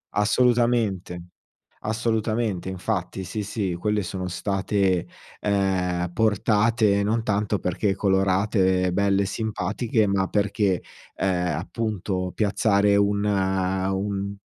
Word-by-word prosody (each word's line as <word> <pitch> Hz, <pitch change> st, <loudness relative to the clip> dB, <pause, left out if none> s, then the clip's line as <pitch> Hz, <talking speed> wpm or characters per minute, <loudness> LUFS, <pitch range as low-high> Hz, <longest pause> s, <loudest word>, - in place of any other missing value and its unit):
Assolutamente, 110 Hz, -6 st, +1 dB, 0.5 s
assolutamente, 110 Hz, -3 st, -1 dB
infatti, 95 Hz, 0 st, -3 dB
sì, 105 Hz, +3 st, -4 dB
sì, 100 Hz, -3 st, -2 dB
quelle 105 Hz, +3 st, 0 dB
sono 95 Hz, 0 st, -4 dB
state, 95 Hz, 0 st, 0 dB, 0.3 s
ehm, 90 Hz, -3 st, 0 dB
portate 105 Hz, -1 st, +2 dB
non 115 Hz, +3 st, +1 dB
tanto 105 Hz, -1 st, 0 dB
perché 95 Hz, +3 st, 0 dB
colorate 95 Hz, -1 st, +2 dB
belle 100 Hz, +1 st, +2 dB
e -, -, 0 dB
simpatiche, 110 Hz, +1 st, -1 dB
ma 95 Hz, -1 st, +1 dB
perché, 100 Hz, -3 st, 0 dB, 0.3 s
ehm, 90 Hz, -4 st, 0 dB
appunto 95 Hz, -3 st, -3 dB
piazzare 100 Hz, -1 st, +2 dB
un 100 Hz, 0 st, +2 dB
un 95 Hz, 0 st, -1 dB
100 Hz, 100 wpm, -24 LUFS, 95-105 Hz, 0.5 s, portate